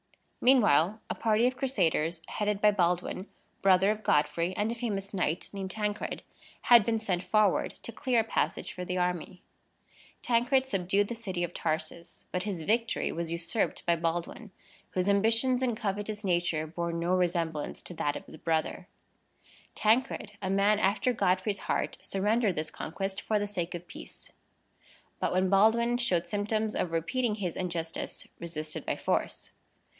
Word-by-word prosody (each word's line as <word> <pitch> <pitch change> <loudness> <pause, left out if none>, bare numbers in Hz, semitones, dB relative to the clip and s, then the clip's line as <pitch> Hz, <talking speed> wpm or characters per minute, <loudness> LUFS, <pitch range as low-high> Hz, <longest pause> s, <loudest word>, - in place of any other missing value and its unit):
Meanwhile, 215 - +5
a - - -2
party 225 +1 +2
of 255 +1 +2
Crusaders, 175 - 0
headed 210 -1 -1
by 210 0 +5
Baldwin, 180 0 0 0.3
brother 190 +1 +5
of 215 0 -3
Godfrey, 170 +2 +1
and 215 +2 +1
a - - -1
famous 210 -5 -4
knight 180 -2 -1
named 195 -1 -4
Tancred, 210 +1 -3 0.4
had 240 -3 +7
been 225 +2 +1
sent 195 -5 -1
forward 210 0 +2
to - - -5
clear 250 -2 +1
a - - -3
passage 180 -5 -1
for 180 - -5
the 180 0 -3
army. 180 0 -2 0.8
Tancred 250 +3 +3
subdued 195 -3 +1
the 235 - -4
city 190 -6 -3
of 175 - -3
Tarsus; 165 +1 -4
but 180 - -1
his 185 -4 -3
victory 230 +5 +1
was 170 0 -3
usurped 170 +6 -1
by 170 - +3
Baldwin, 170 +6 -3 0.4
whose 185 0 -1
ambitions 225 +5 +3
and 240 -4 0
covetous 205 +1 -3
nature 175 -4 +1
bore 170 +2 -3
no 170 +2 0
resemblance 170 -4 -1
to - - -8
that 145 -3 -1
of - - -7
his - - -11
brother. 165 +3 -1 0.9
Tancred, 220 -1 +1
a 190 - -2
man 200 +2 +3
after 215 +5 +2
Godfrey's 195 -1 +1
heart, - - -1
surrendered 205 0 +1
this 155 +1 -3
conquest 195 +4 -4
for 215 - 0
the 205 - 0
sake 180 -4 -3
of 175 0 -7
peace; - - -11 0.9
but, - - 0
when 185 +1 +2
Baldwin 235 +4 +4
showed 180 -8 +1
symptoms 215 +1 -1
of 175 - -1
repeating 210 +8 0
his 185 -6 -3
injustice, 170 -3 -4
resisted 155 -2 -5
by - - -1
force. - - -2
195 Hz, 160 wpm, -29 LUFS, 175-220 Hz, 0.9 s, had